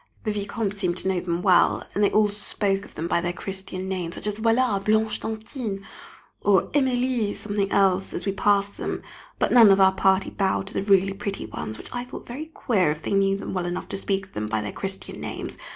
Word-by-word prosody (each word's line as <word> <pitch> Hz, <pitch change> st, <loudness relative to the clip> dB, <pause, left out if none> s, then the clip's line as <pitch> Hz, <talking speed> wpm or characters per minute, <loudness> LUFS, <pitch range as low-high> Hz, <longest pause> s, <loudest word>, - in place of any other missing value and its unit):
The 215 Hz, -, 0 dB
Vicomte 205 Hz, 0 st, -2 dB
seemed 180 Hz, -3 st, -1 dB
to 190 Hz, -, -3 dB
know 190 Hz, -2 st, +1 dB
them 175 Hz, 0 st, -2 dB
well, 185 Hz, -3 st, +4 dB
and 205 Hz, -, +1 dB
they 205 Hz, -, +5 dB
all 210 Hz, -1 st, +3 dB
spoke 200 Hz, -1 st, 0 dB
of -, -, -17 dB
them 165 Hz, -, -3 dB
by 170 Hz, -, +1 dB
their 175 Hz, 0 st, -1 dB
Christian 190 Hz, 0 st, -5 dB
names, 180 Hz, -3 st, -3 dB
such -, -, -9 dB
as, 210 Hz, 0 st, -2 dB
Voilà 225 Hz, -2 st, +2 dB
Blanche 215 Hz, +1 st, +2 dB
d'Antin! 220 Hz, -2 st, -5 dB, 0.6 s
or 200 Hz, -2 st, +3 dB
Emilie 250 Hz, -5 st, +1 dB
something 205 Hz, -2 st, -2 dB
else, 195 Hz, -1 st, +3 dB
as 175 Hz, -, -5 dB
we 195 Hz, -, +1 dB
passed 200 Hz, 0 st, +1 dB
them, -, -, -3 dB, 0.3 s
but -, -, +1 dB
none 230 Hz, -4 st, +9 dB
of 195 Hz, 0 st, +5 dB
our 190 Hz, 0 st, +6 dB
party 190 Hz, 0 st, +2 dB
bowed 195 Hz, -1 st, 0 dB
to 195 Hz, -, -9 dB
the -, -, -1 dB
really 195 Hz, -1 st, +3 dB
pretty 200 Hz, 0 st, -4 dB
ones, 110 Hz, 0 st, -6 dB
which -, -, -11 dB
I 245 Hz, -1 st, -3 dB
thought 250 Hz, -, -9 dB
very 280 Hz, +6 st, -6 dB
queer 215 Hz, -, +1 dB
if 150 Hz, +1 st, -3 dB
they -, -, -2 dB
knew 195 Hz, 0 st, +3 dB
them -, -, -6 dB
well 180 Hz, -2 st, -1 dB
enough 175 Hz, +1 st, -4 dB
to -, -, -3 dB
speak 195 Hz, 0 st, -1 dB
of 190 Hz, -, -25 dB
them 105 Hz, 0 st, -3 dB
by 110 Hz, 0 st, -1 dB
their 105 Hz, -, -4 dB
Christian 195 Hz, 0 st, -5 dB
names. -, -, -5 dB
195 Hz, 230 wpm, -25 LUFS, 190-210 Hz, 0.6 s, none